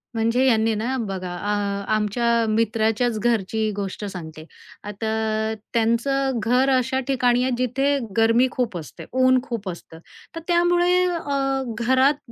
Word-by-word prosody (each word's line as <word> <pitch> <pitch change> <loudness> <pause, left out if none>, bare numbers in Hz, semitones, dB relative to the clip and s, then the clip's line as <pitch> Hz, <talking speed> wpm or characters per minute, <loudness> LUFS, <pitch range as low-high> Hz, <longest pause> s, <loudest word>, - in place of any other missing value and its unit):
म्हणजे 230 +3 +2
यांनी 225 -2 +3
ना, 235 +5 -2
बघा 195 -5 -4
आ 200 +2 -2
आमच्या 230 +2 +1
मित्राच्याच 225 +1 +1
घरची 220 -1 0
गोष्ट 200 +1 -4
सांगते. 160 -5 -8 0.4
आता 220 +1 -2 0.2
त्यांचं 240 +3 +1
घर 250 +5 +2
अशा 260 +1 0
ठिकाणी 250 -2 +2
आहे, 260 - 0
जिथे 270 +3 +1 0.2
गरमी 230 +3 +4
खूप 235 -7 -2
असते, 150 -7 -9
ऊन 255 0 +4
खूप 225 -7 -5
असतं. 165 -2 -10 0.4
तर - - -4
त्यामुळे 350 +1 +3
अ, 275 -6 -1 0.2
घरात 260 +2 +2
230 Hz, 130 wpm, -22 LUFS, 215-260 Hz, 0.4 s, गरमी